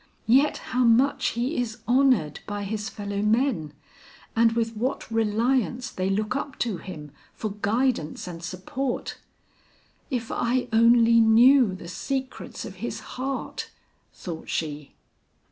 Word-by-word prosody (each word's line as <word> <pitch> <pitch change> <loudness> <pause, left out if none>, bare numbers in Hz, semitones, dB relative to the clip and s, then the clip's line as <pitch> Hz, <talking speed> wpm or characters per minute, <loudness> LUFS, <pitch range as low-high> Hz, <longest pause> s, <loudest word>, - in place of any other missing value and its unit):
Yet 270 +6 +4 0.2
how 250 0 +3
much 245 +4 +3
he 255 +7 -1
is 240 -2 -2
honored 245 - +3
by 205 -1 -3
his 210 +1 -3
fellow 200 -1 -4
men, 215 - +1 0.6
and 230 0 +4
with 230 -1 -1
what 235 +1 -3
reliance 235 +3 +1
they 185 +1 -2
look 210 +4 -1
up 275 -1 -4
to 215 -6 -2
him 155 -7 -9 0.2
for 215 - -4
guidance 220 - 0
and 170 -1 -8
support. 190 +10 -4 0.9
If 245 -5 -3
I 250 +1 0
only 230 0 +6
knew 230 0 +6
the 175 - -10
secrets 265 +8 -4
of - - -9
his - - -4
heart!" 265 +1 -4 0.4
thought 165 -3 -8
she. 150 -2 -4
225 Hz, 130 wpm, -25 LUFS, 200-255 Hz, 0.9 s, only